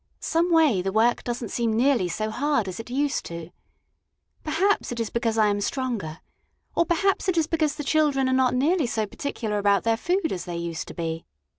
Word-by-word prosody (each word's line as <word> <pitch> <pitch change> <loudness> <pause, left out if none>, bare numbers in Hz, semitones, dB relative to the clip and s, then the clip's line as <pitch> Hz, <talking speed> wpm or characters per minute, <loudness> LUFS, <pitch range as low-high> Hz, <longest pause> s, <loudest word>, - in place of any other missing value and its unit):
Some 335 +2 0
way, 310 - +4
the 195 +1 -2
work 225 +4 +2
does 240 0 -3
n't 225 - -6
seem 230 -2 0
nearly 245 -6 +3
so 215 +5 -3
hard 285 -3 0
as 185 +2 -5
it 225 - -8
used 280 +3 0
to. 170 0 -7 0.9
Perhaps 365 +4 +1
it 240 - -4
is 230 - -2
because 230 -1 0
I 215 - +5
am 205 -1 +1
stronger, 210 - -3 0.5
or 340 - +2
perhaps 385 +2 +1
it 355 - 0
is 325 - +3
because 310 -2 0
the 300 - -5
children 285 -3 +2
are 260 - +1
not 260 -1 +3
nearly 300 +3 +2
so 220 -2 -1
particular 215 -2 -3
about 200 -1 +3
their 225 0 +2
food 355 - 0
as 180 - -4
they 175 -1 -5
used 170 +1 -4
to - - -9
be. 165 -1 -4
240 Hz, 210 wpm, -25 LUFS, 205-300 Hz, 0.9 s, I